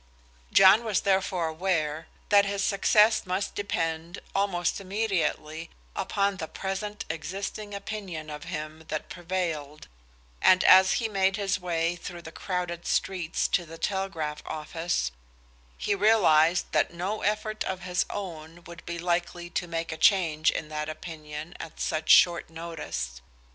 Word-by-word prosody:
John 195 +4 +7
was 215 -4 +1
therefore 190 -3 +1
aware 160 -2 -1 0.2
that 205 -1 +7
his 200 0 -1
success 210 +2 +4
must 185 +2 -1
depend 165 -3 -2 0.2
almost 195 -2 0
immediately 170 -6 -2 0.3
upon 200 -1 0
the 160 - -4
present 200 +3 -4
existing 195 +5 -5
opinion 195 -6 -6
of 150 0 -7
him 155 +1 -6
that 155 - -4
prevailed, 165 -5 -4 0.5
and 185 0 +6
as 190 0 +7
he 230 - 0
made 195 -2 +1
his 200 -1 0
way 170 -1 0
through 175 0 -8
the 160 - -9
crowded 175 -1 -4
streets 180 -3 0
to 180 - +2
the 165 0 -10
telegraph 170 -6 -2
office, 155 - -2 0.7
he - - 0
realized 185 -6 +4
that - - +2
no 185 +5 -3
effort 215 +1 -1
of 190 -1 -3
his 180 0 0
own 170 -3 -7
would 170 +1 -11
be 170 0 -3
likely 175 0 -2
to 175 - -2
make 165 0 -3
a 160 - -4
change 160 -4 +4
in 155 - -3
that 150 0 -3
opinion 155 0 -7
at 160 - -9
such 155 -1 -2
short 170 -2 +6
notice. 160 - -5
175 Hz, 145 wpm, -27 LUFS, 160-195 Hz, 0.7 s, John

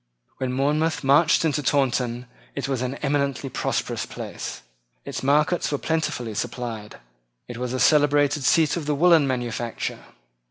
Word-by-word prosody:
When 130 -1 -2
Monmouth 150 +5 0
marched 150 +5 +4
into 150 -2 +1
Taunton 125 -3 0 0.3
it 140 - -3
was 135 -3 -1
an 130 +1 -2
eminently 140 -1 -1
prosperous - - -2
place. - - -7 0.4
Its - - -5
markets 150 +6 +2
were 145 - 0
plentifully 145 -8 -2
supplied. 115 -2 -5 0.5
It 120 - -7
was 125 -1 -3
a 130 - -2
celebrated 145 -1 +3
seat 160 +2 +3
of 160 -4 -4
the 150 - +1
woollen 165 -1 +5
manufacture. 120 -2 -3
140 Hz, 145 wpm, -24 LUFS, 125-150 Hz, 0.5 s, woollen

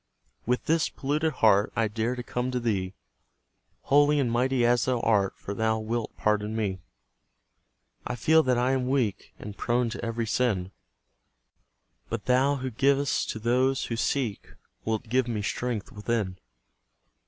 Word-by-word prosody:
With 125 +1 0
this 160 0 +2
polluted 150 +3 -1
heart, 105 -6 +3
I 115 0 +2
dare 110 +4 -2
to 125 - -5
come 125 +1 -2
to 125 -1 -1
Thee, 100 -5 -2 0.9
Holy 145 +1 +4
and 125 -4 +1
mighty 125 +1 +2
as 120 -1 +3
Thou 130 -2 +1
art, 100 -3 +2
For 100 - -6
Thou 110 +2 +1
wilt 110 +1 -3
pardon 105 0 0
me. 100 -4 -1 1.3
I - - -3
feel 160 +7 +4
that 130 -4 +1
I 125 +2 +2
am 130 -1 0
weak, 125 -7 -1
And 105 -1 -8
prone 120 +1 0
to - - -6
every 115 0 -2
sin; 105 -5 0 1.4
But 115 -2 -4
Thou 130 +3 +3
who 130 -1 -4
giv'st 140 +3 +1
to - - -3
those 125 +4 +1
who 115 - -3
seek, 115 -2 -2 0.3
Wilt 110 -1 -1
give 125 +2 +1
me 110 -3 -2
strength 115 0 -3
within. 105 -3 -2
120 Hz, 155 wpm, -27 LUFS, 110-130 Hz, 1.4 s, Holy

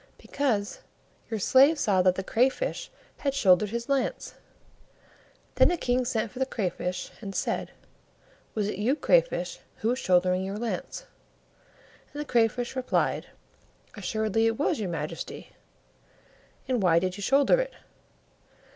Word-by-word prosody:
"Because 225 -8 -2 0.5
your 220 - -2
slave 275 - +5
saw 200 -9 +2
that 185 0 +3
the 190 - -3
Crayfish 260 - 0 0.3
had 275 -1 -2
shouldered 195 -4 +4
his 235 +2 -4
lance." 275 -2 -1 1.2
Then - - +5
the 350 - +1
King 250 -3 0
sent 225 -3 -1
for 250 - -9
the 265 - +2
Crayfish, 180 -5 -3
and 195 -3 -7
said, - - -1 0.9
"Was 210 -2 0
it 210 - -4
you, 240 +7 +2
Crayfish, - - +1 0.2
who 220 - -1
was 250 +2 0
shouldering 180 0 +2
your 195 +2 -4
lance?" 240 - -4 1.1
And 290 - -6
the 295 - -3
Crayfish 240 0 +1
replied, 255 -1 0 0.7
"Assuredly 220 +2 0
it 225 0 0
was, 300 0 0
your 200 -4 -2
Majesty." 165 - -6 1.2
"And 250 -3 0
why 170 -3 +4
did 185 +1 0
you 205 - -8
shoulder 275 - +4
it?" - - -5
225 Hz, 140 wpm, -27 LUFS, 195-265 Hz, 1.2 s, slave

